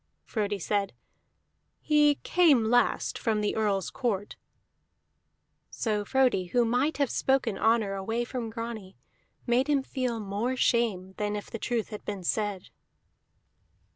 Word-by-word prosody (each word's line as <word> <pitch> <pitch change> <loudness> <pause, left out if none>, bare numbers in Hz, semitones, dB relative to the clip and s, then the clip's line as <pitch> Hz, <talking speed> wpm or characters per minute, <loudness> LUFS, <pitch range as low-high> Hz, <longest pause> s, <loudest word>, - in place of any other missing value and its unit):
Frodi 205 -2 -2
said, 200 +2 -1 0.9
"He 295 -1 +4
came 305 -10 +4
last 245 -1 +2
from 220 -2 0
the 210 -1 -1
Earl's 205 -4 0
court." 210 -6 -2 1.3
So 210 -3 -1
Frodi, 250 -4 +2
who 240 +6 +2
might 250 +7 +1
have 280 -3 +1
spoken 265 -6 +1
honor 220 -2 +2
away 225 +5 -2
from 240 -2 -4
Grani, 225 -4 -7 0.5
made 250 +3 +2
him 285 -2 +2
feel 250 -4 -2
more 210 +5 -2
shame 215 -7 +1
than 210 0 -1
if 205 - -7
the 230 - -5
truth 235 -2 -2
had 210 - -8
been 200 -3 -5
said. 205 0 -2
225 Hz, 135 wpm, -28 LUFS, 205-250 Hz, 1.3 s, He